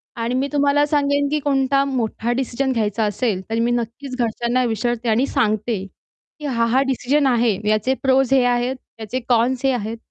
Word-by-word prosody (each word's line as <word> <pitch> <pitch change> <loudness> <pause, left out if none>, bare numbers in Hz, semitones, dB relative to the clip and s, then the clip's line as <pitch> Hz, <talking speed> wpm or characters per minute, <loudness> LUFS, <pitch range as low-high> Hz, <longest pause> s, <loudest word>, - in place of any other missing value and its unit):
आणि 235 0 -2
मी 265 +2 0
तुम्हाला 285 0 +3
सांगेन, 285 -1 +1
की 300 +1 0
कोणता 275 -1 +1
मोठा 240 -3 -2
डिसिजन 265 +1 -1
घ्यायचा 220 -2 0
असेल, 205 -1 -1
तर 225 0 -1
मी 235 +1 +1
नक्कीच 240 +3 -3
घरच्यांना 240 +1 0
विचारते. 240 +1 -1
आणि 230 +4 +2
सांगते, 215 -6 0 0.5
की 300 - -7
हा, 235 -5 +1
हा 245 +3 +2
डिसिजन 270 +2 +1
आहे 235 -5 +2
याचे 215 +4 +2
प्रोज 265 -1 +3
हे 265 -2 +5
आहेत 245 +1 +1 0.2
याचे 225 +4 -3
कॉन्स 245 +2 +2
हे 270 - +4
आहेत 225 -1 -3
245 Hz, 180 wpm, -21 LUFS, 230-270 Hz, 0.5 s, हे